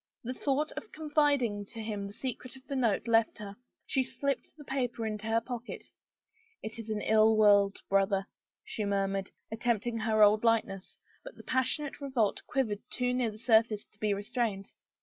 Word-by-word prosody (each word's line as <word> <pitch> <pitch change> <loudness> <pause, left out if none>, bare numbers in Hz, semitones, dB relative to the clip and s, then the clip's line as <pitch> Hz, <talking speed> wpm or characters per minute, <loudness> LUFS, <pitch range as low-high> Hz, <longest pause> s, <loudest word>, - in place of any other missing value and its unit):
The 250 +2 -3
thought 285 +4 0
of 430 - -8
confiding 290 -9 +1
to 225 +3 -11
him 210 -2 -4
the 200 - -10
secret 255 +1 -6
of 260 0 -16
the 275 - -4
note 230 -3 +1
left 225 -1 +3
her. 205 -2 -8 0.3
She 265 - +1
slipped 275 +1 -3
the 295 - -11
paper 250 -4 -2
into 215 0 -4
her 225 +1 +3
pocket.. 245 +1 -7 0.4
" 455 +1 -38
It 220 +1 -6
is 225 -1 -7
an 215 -1 -2
ill 220 +1 +4
world, 205 -2 +4
brother," 195 0 +2 0.4
she 215 - -4
murmured, 195 -1 -1 0.2
attempt 225 -1 0
ing 235 -1 -2
her 220 -1 +3
old 210 +1 +5
lightness, 215 -5 0 0.3
but - - -10
the - - -13
passionate 270 +3 -1
revolt 260 -7 0
quivered 225 -7 0
too 250 -1 0
near 250 -2 +1
the 210 - -9
surface 220 -2 +3
to 210 - -24
be 210 -1 +1
restrained. 205 0 -2
225 Hz, 185 wpm, -30 LUFS, 210-260 Hz, 0.4 s, old